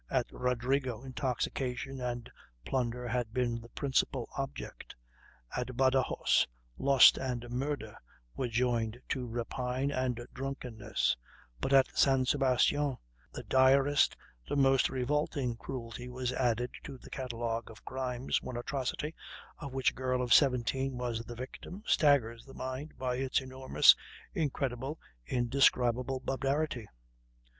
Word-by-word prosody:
At -, -, +1 dB
Rodrigo 125 Hz, 0 st, -1 dB
intoxication 130 Hz, 0 st, -3 dB
and 120 Hz, -1 st, -3 dB, 0.4 s
plunder 125 Hz, -1 st, -1 dB
had 120 Hz, -1 st, -2 dB
been 120 Hz, -2 st, 0 dB
the 115 Hz, -, -13 dB
principal 130 Hz, -2 st, 0 dB
object; 135 Hz, -1 st, -6 dB, 0.6 s
at 125 Hz, 0 st, -3 dB
Badajos 130 Hz, 0 st, +3 dB, 0.3 s
lust 135 Hz, -2 st, +7 dB
and 125 Hz, -2 st, -3 dB
murder 125 Hz, -4 st, -3 dB, 0.4 s
were 130 Hz, -, -1 dB
joined 120 Hz, -1 st, 0 dB
to 125 Hz, -2 st, -2 dB
rapine 125 Hz, +3 st, -2 dB
and 130 Hz, -3 st, -1 dB
drunkenness; 130 Hz, -4 st, -2 dB, 0.4 s
but 135 Hz, -, -2 dB
at 135 Hz, -1 st, +5 dB
San 135 Hz, -2 st, +4 dB
Sebastian 135 Hz, +1 st, +2 dB, 0.3 s
the -, -, -7 dB
direst, 135 Hz, +2 st, +4 dB, 0.3 s
the -, -, 0 dB
most 135 Hz, -2 st, +4 dB
revolting 130 Hz, -1 st, -1 dB
cruelty 120 Hz, 0 st, -6 dB
was 125 Hz, 0 st, -2 dB
added 125 Hz, -1 st, 0 dB
to 140 Hz, -2 st, -8 dB
the -, -, -15 dB
catalogue 115 Hz, -3 st, -3 dB
of 110 Hz, -, -14 dB
crimes 130 Hz, -1 st, -2 dB
one 125 Hz, -, -5 dB
atrocity, 140 Hz, +4 st, -3 dB, 0.5 s
of 140 Hz, -4 st, -6 dB
which 130 Hz, -1 st, +2 dB
a -, -, -21 dB
girl 125 Hz, -1 st, -1 dB
of 120 Hz, -, +3 dB
seventeen 130 Hz, -1 st, +3 dB
was 120 Hz, -2 st, -2 dB
the 120 Hz, +1 st, -8 dB
victim, 130 Hz, -, -8 dB
staggers 120 Hz, -7 st, +3 dB
the 135 Hz, -, -14 dB
mind 130 Hz, +4 st, -5 dB
by 125 Hz, -1 st, -1 dB
its 130 Hz, 0 st, +1 dB
enormous, 130 Hz, 0 st, +5 dB, 0.4 s
incredible, 135 Hz, -1 st, -2 dB, 0.3 s
indescribable 125 Hz, 0 st, +2 dB
barbarity... 135 Hz, -3 st, -1 dB
130 Hz, 125 wpm, -32 LUFS, 120-135 Hz, 0.6 s, lust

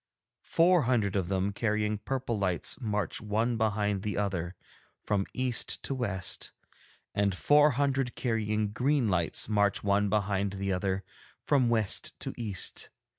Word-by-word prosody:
Four 170 Hz, -3 st, +4 dB
hundred 105 Hz, -6 st, +1 dB
of 95 Hz, -3 st, 0 dB
them 95 Hz, +1 st, 0 dB
carrying 105 Hz, -1 st, 0 dB
purple 130 Hz, 0 st, -2 dB
lights 95 Hz, +7 st, -1 dB
march 105 Hz, -6 st, -2 dB
one 110 Hz, +3 st, 0 dB
behind 105 Hz, -3 st, 0 dB
the 105 Hz, 0 st, -3 dB
other, 95 Hz, -3 st, -2 dB, 0.5 s
from 100 Hz, -2 st, 0 dB
east 130 Hz, -2 st, 0 dB
to -, -, -2 dB
west, 100 Hz, -9 st, -2 dB, 0.6 s
and 100 Hz, -2 st, +1 dB
four 150 Hz, +6 st, +5 dB
hundred 135 Hz, -3 st, 0 dB
carrying 110 Hz, -3 st, -1 dB
green 130 Hz, +2 st, +1 dB
lights 85 Hz, -3 st, +1 dB
march 105 Hz, -1 st, +1 dB
one 100 Hz, 0 st, +2 dB
behind 100 Hz, -1 st, 0 dB
the 100 Hz, 0 st, -2 dB
other, 95 Hz, +1 st, -1 dB, 0.4 s
from 130 Hz, -5 st, +3 dB
west 110 Hz, -4 st, -1 dB
to -, -, -3 dB
east. 105 Hz, -6 st, -4 dB
105 Hz, 140 wpm, -29 LUFS, 100-120 Hz, 0.6 s, four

